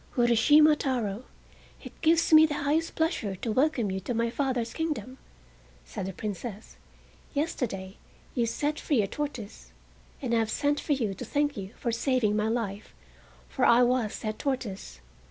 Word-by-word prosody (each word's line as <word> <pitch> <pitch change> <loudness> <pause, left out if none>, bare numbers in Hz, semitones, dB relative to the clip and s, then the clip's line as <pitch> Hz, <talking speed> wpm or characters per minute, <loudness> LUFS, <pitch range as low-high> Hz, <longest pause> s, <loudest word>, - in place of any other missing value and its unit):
"Urashima 290 +6 +6
Taro, 245 -5 -2 0.6
it - - -12
gives 330 0 +3
me 315 0 +9
the 295 - -3
highest 315 +3 0
pleasure 320 - -1
to 220 +5 -3
welcome 255 -4 +1
you 190 - -2
to 230 +6 -4
my 230 0 0
father's 250 -3 -1
kingdom," 270 -6 -4 0.7
said 65 - -5
the - - -3
Princess. 210 +2 -6 0.6
"Yesterday 215 - -3 0.4
you 235 -3 +1
set 295 +6 -1
free 260 -9 +1
a - - -2
tortoise, 250 -4 -6 0.5
and 250 -4 -2
I 230 - +4
have 225 -1 0
sent 290 +4 0
for 300 - 0
you 225 -8 -1
to 190 - -7
thank 290 0 0
you 195 +1 -7
for 235 - -2
saving 230 -3 +1
my 215 0 +1
life, 220 -3 -3 0.5
for 265 - -3
I 240 0 +6
was 245 -3 +1
that 215 -1 -4
tortoise. 205 - -4
240 Hz, 165 wpm, -28 LUFS, 215-290 Hz, 0.7 s, me